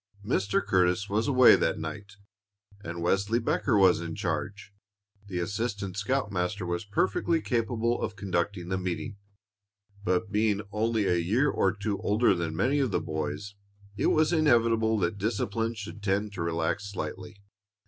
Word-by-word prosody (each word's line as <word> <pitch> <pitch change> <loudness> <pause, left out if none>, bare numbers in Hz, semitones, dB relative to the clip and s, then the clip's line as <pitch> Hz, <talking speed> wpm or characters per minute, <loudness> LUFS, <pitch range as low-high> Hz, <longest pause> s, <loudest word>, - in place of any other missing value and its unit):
Mr. 100 0 0
Curtis 95 0 +2
was 105 +5 0
away 130 -3 +7
that - - 0
night, 100 -1 -7 0.7
and 85 0 -5
Wesley 100 +5 +1
Becker 120 0 +1
was 95 -3 +5
in 85 -1 -5
charge. 100 0 -4 0.5
The 95 -3 -4
assistant 100 +1 -3
scoutmaster 100 -4 -1
was 85 +3 -3
perfectly 100 - +1
capable 115 -2 -1
of 105 - -3
conducting 95 -1 -2
the 95 0 -1
meeting, 95 +2 -4 0.9
but 95 +3 0
being 105 -1 +1
only 110 0 0
a 90 -2 +2
year 110 +12 +2
or 95 - +2
two 105 0 -3
older 105 +2 +3
than 85 -3 -3
many 130 - +1
of 135 -3 +1
the - - 0
boys, 80 +6 -4 0.4
it - - 0
was 155 +2 +3
inevitable 115 -7 +3
that 95 +1 -1
discipline 110 +2 -1
should 100 -1 -8
tend 100 +1 -1
to 90 - -5
relax 85 +4 -1
slightly. 100 +1 -6
100 Hz, 150 wpm, -28 LUFS, 90-110 Hz, 0.9 s, away